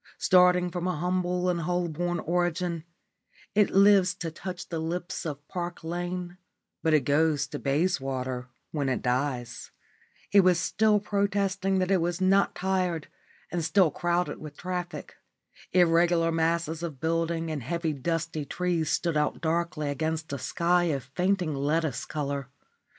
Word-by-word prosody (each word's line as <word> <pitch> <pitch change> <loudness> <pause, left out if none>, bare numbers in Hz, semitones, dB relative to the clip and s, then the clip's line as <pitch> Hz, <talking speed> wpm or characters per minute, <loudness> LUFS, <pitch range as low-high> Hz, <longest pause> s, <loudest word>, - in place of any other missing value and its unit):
Starting 180 -1 +4
from 175 0 -2
a 180 - 0
humble 180 +2 0
and 175 -1 +1
Holborn 175 0 -1
origin, 175 -1 -1 0.7
it 210 -1 +4
lives 195 -1 +5
to 170 -4 -5
touch 180 +2 -7
the 165 - -3
lips 175 +2 -3
of 145 -1 -6
Park 175 -1 -5
Lane, 175 +1 -4 0.4
but 160 - +1
it 150 - +4
goes 145 +1 +2
to 145 0 -6
Bayswater 135 -5 -1 0.2
when 145 -3 -1
it 130 - -1
dies. 125 -1 -2 0.6
It 200 - +7
was 180 -2 +5
still 210 +4 +3
protesting 200 -1 0
that 185 0 +1
it 190 -3 +3
was 175 +1 -1
not 195 +1 +3
tired 180 -4 -1 0.4
and 175 -1 -1
still 160 +1 +4
crowded 175 +3 -1
with 150 -2 -9
traffic. 180 -1 -5 0.5
Irregular 170 -1 +4
masses 165 0 0
of 160 -6 -5
buildings 165 +1 -1
and 150 -3 -3
heavy 165 +5 -2
dusty 160 +2 -2
trees 170 +1 -1
stood 170 -2 0
out 150 0 0
darkly 165 -2 -1
against 160 +1 -2
a 140 - -3
sky 175 +1 +1
of 140 -6 -1
fainting 180 -2 +1
lettuce 145 0 -1
colour. 140 -3 -3
170 Hz, 145 wpm, -27 LUFS, 155-180 Hz, 0.7 s, It